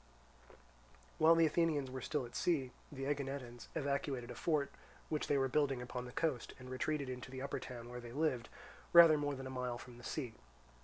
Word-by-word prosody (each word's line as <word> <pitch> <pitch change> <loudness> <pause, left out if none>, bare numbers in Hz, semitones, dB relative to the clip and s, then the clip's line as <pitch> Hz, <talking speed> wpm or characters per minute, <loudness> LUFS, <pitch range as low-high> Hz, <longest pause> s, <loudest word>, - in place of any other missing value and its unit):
While 160 +1 +7
the 165 0 +6
Athenians 155 -4 +1
were 130 0 -5
still 145 0 -1
at 120 - -11
sea, 140 -8 +1 0.2
the 135 -2 -4
Aeginetans 135 -4 -3
evacuated 140 -4 -1
a - - -4
fort 150 -4 0 0.4
which 155 -1 -1
they 145 - +3
were 135 -1 +3
building 135 -1 +2
upon 125 0 -5
the 125 - -8
coast, 145 -4 -1
and 130 0 -10
retreated 140 +2 -1
into 125 0 -5
the 130 +1 -5
upper 140 - -2
town 120 -2 -7
where 125 0 -7
they 120 -1 -8
lived, 130 -4 0 0.4
rather 170 -2 +10
more 145 -1 0
than 135 0 -6
a 130 - -5
mile 125 -2 -2
from 120 0 -11
the - - -13
sea. 125 -3 -3
135 Hz, 200 wpm, -37 LUFS, 125-150 Hz, 0.4 s, rather